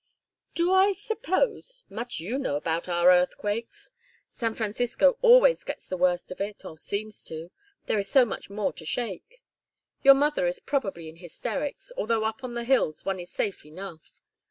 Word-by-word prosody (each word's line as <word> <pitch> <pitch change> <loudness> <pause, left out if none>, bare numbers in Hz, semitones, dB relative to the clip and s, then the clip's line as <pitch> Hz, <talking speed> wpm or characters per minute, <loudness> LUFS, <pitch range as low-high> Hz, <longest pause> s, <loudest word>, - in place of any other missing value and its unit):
"Do 345 +2 +2
I 385 +1 +5
suppose 455 +4 -2
much 240 -5 -5
you 220 +12 -3
know 265 - -1
about 165 +4 -2
our 175 +1 +5
earthquakes! 205 - 0 0.4
San 230 -3 -2
Francisco 245 - +1
always - - +6
gets - - -6
the - - -4
worst 180 0 +1
of 185 - -7
it, 200 -1 -5
or 160 - -8
seems 205 +6 -4
to, 165 +2 -7 0.3
there 215 - +1
is 195 0 -3
so 265 -3 +6
much 215 - -6
more 205 0 -2
to - - -9
shake. 235 - -5 0.6
Your 275 0 +9
mother 290 -9 +2
is 175 - -2
probably 195 - -2
in 160 +1 -11
hysterics, 225 - -5
although 230 - 0
up 220 +4 -3
on 245 -2 -5
the 235 - -2
hills 235 - +1
one 195 -1 -1
is 175 0 -8
safe 195 - -2
enough. 160 +1 -10
215 Hz, 175 wpm, -27 LUFS, 180-275 Hz, 0.6 s, Your